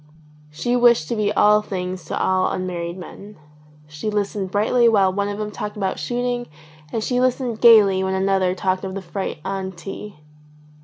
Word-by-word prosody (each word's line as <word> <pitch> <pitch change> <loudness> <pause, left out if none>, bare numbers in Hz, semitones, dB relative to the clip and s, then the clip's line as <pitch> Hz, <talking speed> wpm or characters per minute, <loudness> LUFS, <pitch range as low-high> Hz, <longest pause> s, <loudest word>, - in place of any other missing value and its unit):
She 160 +12 -2
wished 240 -9 +4
to - - -1
be 210 -1 0
all 210 +1 +5
things 185 -2 -5
to - - -3
all 185 0 +1
unmarried 175 -1 -4
men. 200 +3 -11 0.5
She 150 +8 -5
listened 205 -2 -2
brightly 230 +4 +3
while 195 -4 +3
one 200 +1 -1
of 205 - -4
them 210 0 -4
talked 210 0 -6
of 195 -2 -2
shooting 245 0 -2 0.4
and 225 - -2
she 250 +1 0
listened 250 -3 -1
gaily 205 -5 +6
when 190 0 -1
another 190 -1 +1
talked 185 0 -1
of 190 0 -5
the 195 - -5
freight 190 0 -4
on 190 -1 -3
tea. 195 +2 -9
200 Hz, 175 wpm, -21 LUFS, 185-215 Hz, 0.5 s, gaily